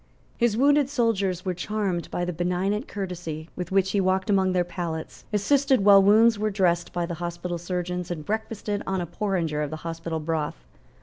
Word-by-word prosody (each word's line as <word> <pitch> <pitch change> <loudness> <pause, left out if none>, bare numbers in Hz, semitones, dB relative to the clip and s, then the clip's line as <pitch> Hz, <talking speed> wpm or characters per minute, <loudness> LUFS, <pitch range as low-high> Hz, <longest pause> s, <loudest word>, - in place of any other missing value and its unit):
His 235 -2 +1
wounded 285 +1 +4
soldiers 200 -9 0
were 185 - 0
charmed 190 -1 -2
by 175 - -2
the 180 - -3
benignant 180 - -1
courtesy 175 -5 -5
with 180 0 -5
which 190 0 +2
he 200 - +2
walked 190 +2 +1
among 190 -1 +3
their 180 -1 +2
pallets, 170 -2 -5
assisted 260 +2 +2
while 200 -1 +8
wounds 215 +2 +5
were 215 0 +1
dressed 175 -4 +1
by 175 -1 -1
the 170 - -5
hospital 175 0 -4
surgeons, 180 0 -3
and 160 -4 -5
breakfasted 215 -1 -3
on 190 -1 0
a 175 - -2
porringer 170 -4 -1
of 150 - -2
the 155 - -5
hospital 165 0 -3
broth. 155 - -3
185 Hz, 185 wpm, -25 LUFS, 170-205 Hz, -, while